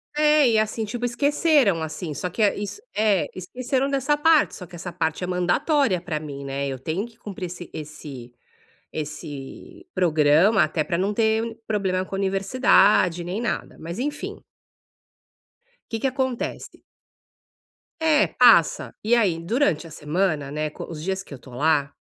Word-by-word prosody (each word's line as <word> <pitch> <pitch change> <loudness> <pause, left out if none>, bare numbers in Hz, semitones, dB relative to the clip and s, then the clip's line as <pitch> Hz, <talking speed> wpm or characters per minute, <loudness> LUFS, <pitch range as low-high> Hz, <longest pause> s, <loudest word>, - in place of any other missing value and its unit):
É, 300 -2 +5
e, 220 - +3
assim, 220 +1 -1
tipo, 240 +3 -4
esqueceram, 280 - +2
assim, 155 0 -5
só 180 +6 -3
que 220 - -4
é 205 - +4
isso 205 - -5
É, 210 -3 +2
esqueceram 255 +8 -2
dessa 280 +2 +1
parte. 320 0 +4
Só 180 - -8
que 175 +1 -13
essa 175 +1 -6
parte 160 0 -2
é - - -2
mandatória 185 - +1
pra 160 -4 -3
mim, 140 -2 -7
né, 140 +1 -3
eu 135 -2 -4
tenho 165 - -2
que 230 -1 -16
cumprir 195 -5 -7
esse 175 0 -9
esse 145 -5 -9 0.6
esse 150 - -7
programa, 160 +3 +4
até 155 0 -1
pra 170 0 -2
não 200 +3 0
ter 225 +1 0
problema 190 -4 0
com - - -12
a - - -2
universidade 195 -3 +3
nem 180 +5 -3
nada, 235 - -3
mas 170 +6 -6
enfim. 295 +3 -4 1.5
Que 225 - -2
que 270 - +2
acontece 260 -2 -3 1.2
É, 310 -2 +4
passa. 230 -10 +4
E 235 +3 +3
aí 190 -8 +2
durante 175 - 0
a - - -13
semana, 150 -2 -1
né, 155 0 -2
co - - -9
os 155 -2 -7
dias 190 +1 -2
que 145 - -12
eu 130 - -9
tô 130 - -15
lá, 145 +1 +1
190 Hz, 165 wpm, -24 LUFS, 155-235 Hz, 1.5 s, É